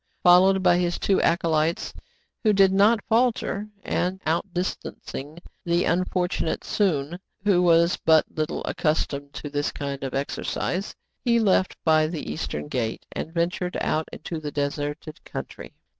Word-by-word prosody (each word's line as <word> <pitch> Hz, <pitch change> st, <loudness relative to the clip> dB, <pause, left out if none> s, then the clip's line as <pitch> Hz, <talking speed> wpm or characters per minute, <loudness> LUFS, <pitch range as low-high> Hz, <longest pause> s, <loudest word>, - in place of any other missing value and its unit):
Followed 185 Hz, +2 st, +6 dB
by 175 Hz, -1 st, +5 dB
his 175 Hz, -1 st, 0 dB
two 195 Hz, -, +2 dB
acolytes, 165 Hz, -1 st, +1 dB, 0.5 s
who 215 Hz, -2 st, +4 dB
did 195 Hz, -1 st, +5 dB
not 210 Hz, +3 st, +4 dB
falter, 225 Hz, -3 st, +1 dB, 0.2 s
and 185 Hz, +2 st, -1 dB
outdistancing 165 Hz, -3 st, -3 dB, 0.3 s
the 170 Hz, 0 st, +1 dB
unfortunate 180 Hz, -1 st, 0 dB
Soun, 170 Hz, -4 st, 0 dB, 0.2 s
who 195 Hz, -4 st, +4 dB
was 170 Hz, 0 st, +4 dB
but 160 Hz, -1 st, +5 dB
little 155 Hz, -1 st, -2 dB
accustomed 145 Hz, -2 st, -1 dB
to -, -, -6 dB
this 145 Hz, 0 st, -1 dB
kind 140 Hz, -1 st, -5 dB
of 135 Hz, -, -4 dB
ex 140 Hz, +1 st, -2 dB
ercise, 190 Hz, +3 st, -3 dB, 0.3 s
he 235 Hz, -2 st, +3 dB
left 190 Hz, -3 st, +2 dB
by 155 Hz, -1 st, +4 dB
the 160 Hz, -, -5 dB
eastern 75 Hz, -1 st, -4 dB
gate, 115 Hz, +4 st, -3 dB
and 160 Hz, -, -5 dB
ventured 175 Hz, +1 st, -1 dB
out 155 Hz, 0 st, 0 dB
into 160 Hz, +1 st, -6 dB
the 150 Hz, -1 st, -5 dB
deserted 145 Hz, +2 st, -4 dB
country. -, -, -8 dB
170 Hz, 145 wpm, -25 LUFS, 150-185 Hz, 0.5 s, Followed